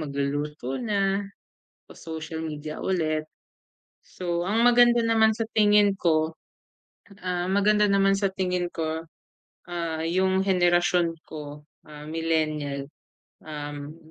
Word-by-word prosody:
magluluto 140 -2 -3
na 200 -4 +1 0.6
o - - -15
social 160 0 -7
media 155 -1 -5
ulit. 155 -4 -1 0.7
So, 175 -1 -4
ang 220 +4 +2
maganda 240 0 +6
naman 220 -1 +4
sa 225 - -3 0.2
tingin 205 -2 +5
ko, 160 -1 +1 0.9
ah, 180 0 -1
maganda 210 +1 +3
naman 195 0 +4
sa 195 0 +1
tingin 180 -2 -1
ko, 160 -1 -3 0.6
ah, 165 -2 -3
yung 190 +2 +1
henerasyon 175 -2 +2
ko, 150 -1 -9 0.2
ah, 150 0 -10
millennial, 155 -3 -1 0.6
um, 145 0 -6
170 Hz, 110 wpm, -26 LUFS, 155-195 Hz, 0.9 s, maganda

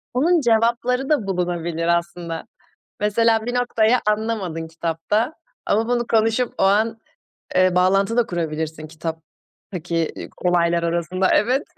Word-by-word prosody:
Bunun 330 +5 +3
cevapları 240 +3 +1
da 240 -10 +1
bulunabilir 175 -2 -2
aslında. 170 -1 -6 0.5
Mesela 225 +2 +2
bir 245 - -2
noktayı 245 -1 +2
anlamadın 210 -7 -1
kitapta 170 - -1 0.3
ama 225 +3 +1
bunu 240 -1 0
konuşup 225 +2 +1
o - - 0
an, 220 +3 +2 0.6
eee, 185 -1 +4
bağlantı 195 +5 +2
da 240 - +3
kurabilirsin 160 -2 -3
kitaptaki, 165 +1 -5
ııı, - - -7
olaylar 170 -1 +1
arasında. 170 +2 0
Evet. 255 +7 +2
195 Hz, 120 wpm, -21 LUFS, 170-230 Hz, 0.6 s, eee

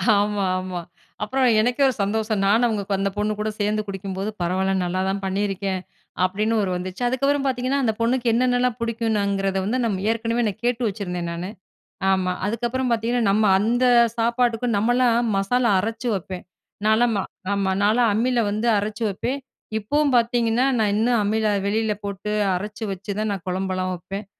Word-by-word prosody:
ஆமா 205 -1 +1
ஆமா. 185 -1 -4 0.4
அப்பறம் 250 0 +2
எனக்கே 245 +5 +1
ஒரு 260 - +1
சந்தோஷம் 215 0 -1
நானும் 225 +5 +4
அவங்க 215 -3 -1 0.2
அந்த 195 0 +1
பொண்ணு 210 +1 0
கூட 215 +1 -1
சேர்ந்து 210 +1 +1
குடிக்கும்போது, 195 +1 -4
"பரவால்ல 185 +2 0
நல்லா 180 +1 -1
தான் 195 +1 -2
பண்ணியிருக்கேன்" 195 -1 -1 0.4
அப்டின்னு 210 +5 +1
ஒரு 190 - -1
வந்துச்சு 185 +4 -5
அதுக்கப்றம் 275 +3 +1
பாத்தீங்கன்னா 260 +1 0
அந்த 225 -3 +2
பொண்ணுக்கு 240 +1 +1
என்னென்னலாம் 250 0 +2
புடிக்குனுங்கறத 205 -4 0
வந்து 235 +5 0
நம்ம 195 -4 -1
ஏற்கனவே 230 +1 -1
நான் 210 +1 -5
கேட்டு 245 0 0
வச்சிருந்தேன் 180 -4 -4
நானு. 175 +2 -5 0.6
ஆமா 185 -1 +1
அதுக்கப்பறம் 240 +4 -1
பாத்தீங்கன்னா 235 +1 +1
நம்ம 215 +2 +3
அந்த 240 +4 +2 0.3
சாப்பாட்டுக்கும் 235 0 +1
நம்மலாம் 235 +1 +2
மசாலா 235 +4 +2
அரைச்சி 225 +4 -2
வைப்பேன். 185 0 -6 0.4
நான்லாம் 220 +1 +3 0.4
ஆமா 195 -1 0
நான்லாம் 225 +2 +3
அம்மில 240 +3 +1
வந்து 215 +3 -1
அரைச்சி 210 +2 -3
வைப்பேன் 250 +8 -3 0.4
இப்போவும் 280 +7 +1
பாத்தீங்கன்னா, 235 0 +2
நான் 215 -2 +2
இன்னும் 230 +3 +2
அம்மில 215 +1 +1 0.2
வெளில 215 +1 +1
போட்டு 200 +1 -4 0.2
அரைச்சி 210 +4 -5
வச்சு 195 +2 -5
தான் 215 0 0
நான் 195 -3 -4
குழம்புலாம் 185 0 -1
வைப்பேன். 195 +4 -6
215 Hz, 155 wpm, -23 LUFS, 195-240 Hz, 0.6 s, நானும்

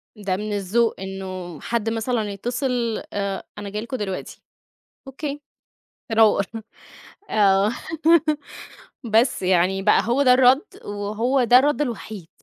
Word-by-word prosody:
ده 195 -3 -2
من 210 +1 -4
الذوق 205 +4 0
إنه 185 -3 -7
حد 230 -1 -1
مثلًا 225 -2 -1
يتصل، 240 +2 -2
آآ، 200 -1 -3
أنا 205 -1 -6
جاي 210 +2 -4
لكم 255 +3 -5
دلوقتي. 195 -4 -5 0.7
أوكي. 285 +2 -5 0.7
تنور، 220 -2 +4 0.9
آه 200 -1 +3 1.4
بس 230 0 +2
يعني 185 +1 +2
بقى 210 - +4
هو 240 +5 +1
ده 250 -2 +6
الرد 260 +2 +5 0.2
وهو 215 +6 -1
ده 245 +2 +7
الرد 290 +2 +1
الوحيد. 220 - -4
215 Hz, 120 wpm, -22 LUFS, 195-245 Hz, 1.4 s, ده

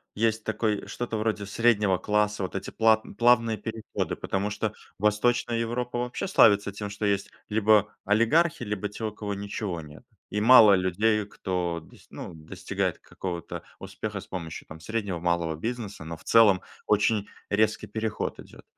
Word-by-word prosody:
есть 110 0 +1
такой, 110 -1 -1
что-то 120 -2 -4
вроде 105 -2 -1
среднего 105 -2 +2
класса, 105 0 +1
вот 95 - -5
эти 95 - -4
плат 110 -1 +4
плавные 115 -2 +4
переходы, 110 +1 -4
потому 100 +2 -2
что 105 0 -2 0.2
Восточная 115 +4 +1
Европа 120 +1 -2
вообще 125 +10 -3
славится 100 - +5
тем, 105 +1 -6
что 105 +1 -4
есть 100 -1 0 0.2
либо 105 -1 +3
олигархи, 125 - +3
либо 105 -2 -3
те, 110 - -8
у 110 - -2
кого 105 -1 -5
ничего 100 -3 -4
нет. 75 0 -13 0.3
И 105 - -1
мало 110 -3 +8
людей, 100 +4 +2
кто 90 -4 -3
дос - - -19
ну, - - -8
достигает 90 +3 -3
какого-то 85 -3 -6 0.2
успеха - - -5
с - - -12
помощью, 85 -4 -6
там, 80 +1 -10
среднего 100 -1 -3
и - - -15
малого 85 -2 0
бизнеса, 110 -1 -5
но 80 0 -6
в - - -19
целом 105 -5 +5 0.3
очень 105 0 +2 0.2
резкий 110 +1 +1
переход 110 -1 -3
идет. - - -13
105 Hz, 165 wpm, -27 LUFS, 95-110 Hz, 0.3 s, мало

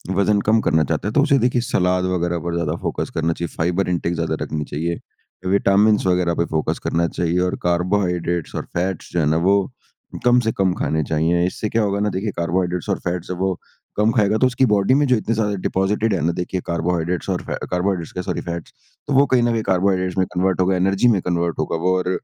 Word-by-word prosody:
वज़न 100 +2 +3
कम 110 +1 +4
करना 80 0 +2
चाहता 75 - -2
है, - - -1
तो 145 - +4
उसे 140 -1 +3
देखिए 125 0 +1
सलाद 90 -5 +1
वगैरह 85 -1 -1
पर 85 0 -3
ज़्यादा 85 -2 -1
फोकस - - -3
करना 80 0 +1
चाहिए, 85 +1 -4
फाइबर 90 +3 0
इंटेक 85 -1 -1
ज़्यादा - - -1
रखनी 75 -1 -3
चाहिए। 85 +5 -3 0.5
अ, - - -1
विटामिन्स 100 +2 +3
वगैरह 90 -2 +2
पे 85 - 0
फोकस 80 - -1
करना 85 +1 +1
चाहिए 85 +1 -1
और - - -3
कार्बोहाइड्रेट्स 90 -1 0
और - - -3
फैट्स 90 0 -3
जो 90 - +1
हैं 80 - +2
ना 80 +1 +2
वो 100 -1 +2 0.5
कम 125 0 +5
से 115 -2 0
कम 95 -2 +2
खाने 80 -3 -1
चाहिए। 80 +3 +1
इससे 105 +3 -4
क्या 115 - +1
होगा 100 -1 0
ना 105 +1 +1
देखिए 105 +2 -2
कार्बोहाइड्रेट्स 90 0 -1
और - - 0
फैट्स 90 0 -3
जब 90 - -4
वो 95 -2 -1 0.4
कम 105 +2 +3
खाएगा, 105 -2 +2
तो 130 - +4
उसकी 130 +1 +2
बॉडी 105 0 +3
में 145 +2 +3
जो 130 - +4
इतने 115 0 -1
सारे 105 -2 0
डिपॉज़िटेड 105 +4 0
हैं 95 - 0
ना, 85 - +2
देखिए 90 +1 -3
कार्बोहाइड्रेट्स 85 0 -1
और - - -1
फै - - -4 0.2
कार्बोहाइड्रेट्स 90 -2 -1
क्या 90 - -3
सॉरी - - -3
फैट्स, 85 -1 -6 0.3
तो 145 - -1
वो 135 +1 +5
कहीं 125 -3 +2
ना 120 - +2
कहीं 115 -1 -1
कार्बोहाइड्रेट्स 95 -1 +1
में 95 - +3
कन्वर्ट 95 +1 +1
होगा, 95 +1 +2
एनर्जी 95 +5 +2
में 105 -6 +3
कन्वर्ट 85 -1 -1
होगा 80 - -1
वो 95 0 +3
और 90 0 -1
90 Hz, 230 wpm, -21 LUFS, 85-105 Hz, 0.5 s, कम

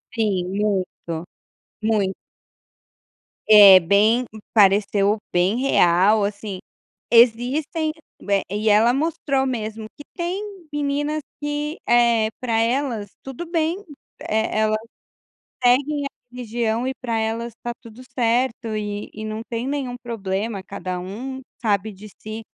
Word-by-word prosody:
Sim, 200 -5 0
muito. 190 -5 -2 0.6
Muito. 210 -3 +1 1.4
É, 200 -3 +10
bem 210 +7 +3 0.3
pareceu 200 0 +4
bem 180 +4 +2
real 205 -4 +4
assim. 200 -2 -5 0.5
Existem 255 +7 +3 0.3
ué 200 -1 +1
e 210 +2 -2
ela 220 +3 +5
mostrou 275 -2 0
mesmo 220 -3 -4
que 290 - -10
tem 355 +3 -2 0.3
meninas 295 +1 -1 0.2
que, 295 +2 -3
eh, 235 -2 +4
para 230 -3 0
elas 230 -4 -1
tudo 270 +6 -7
bem, 330 0 0 0.4
e - - -8
elas 215 0 +1 0.9
seguem 280 +4 +3
a 280 - -3 0.2
religião 235 -1 -2
e 265 - -1
para 235 -3 -3
elas 225 +1 -2
está 240 - -5
tudo 230 0 -13 0.2
certo, 235 -1 0
e 205 -1 -4
e 215 - -7
não 215 0 -4
tem 230 +1 -3
nenhum 270 -3 -3
problema, 205 -2 -3
cada 185 -2 -5
um 240 +9 -6 0.2
sabe 210 -1 0
de 205 +2 -12
si. 215 +1 -6
225 Hz, 120 wpm, -22 LUFS, 205-255 Hz, 1.4 s, É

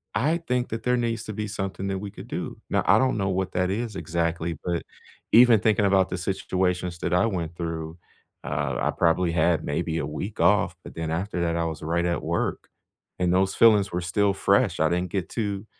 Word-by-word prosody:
I 150 +10 +2
think 125 -1 0
that 115 0 -4
there 125 0 +2
needs 115 -2 -1
to 110 - -5
be 105 +1 -3
something 95 -2 -4
that 95 -1 -2
we 105 - -6
could - - -11
do. - - -5
Now - - +2
I - - +6
don't 130 0 +2
know 95 -2 0
what 95 0 -1
that 90 0 +1
is 110 +1 -3
exactly, 85 0 -2
but 85 -1 -1 0.5
even 120 -1 +7
thinking 105 -2 +3
about 95 -1 +3
the - - -3
situations 90 -1 -1
that 85 - -2
I 90 +4 +4
went 85 -5 -3
through, 80 -1 -5 0.5
uh, 70 -2 -2
I - - +1
probably 85 +1 +2
had 80 -1 +2
maybe 80 +2 -2
a 75 - -2
week 75 +8 -6
off, - - +3
but - - -11
then 80 -1 -3
after 90 +2 -2
that, 85 -1 0
I 85 0 0
was 80 -2 -4
right 85 +2 0
at 85 -4 -1
work. - - -2 0.5
And 90 -1 +2
those 95 +1 +2
feelings 105 -4 +5
were 90 - -2
still 100 +3 +1
fresh. - - +2
I - - +3
didn't 90 +1 -1
get 95 -4 -2
to 100 -3 -3
90 Hz, 215 wpm, -25 LUFS, 85-105 Hz, 0.5 s, even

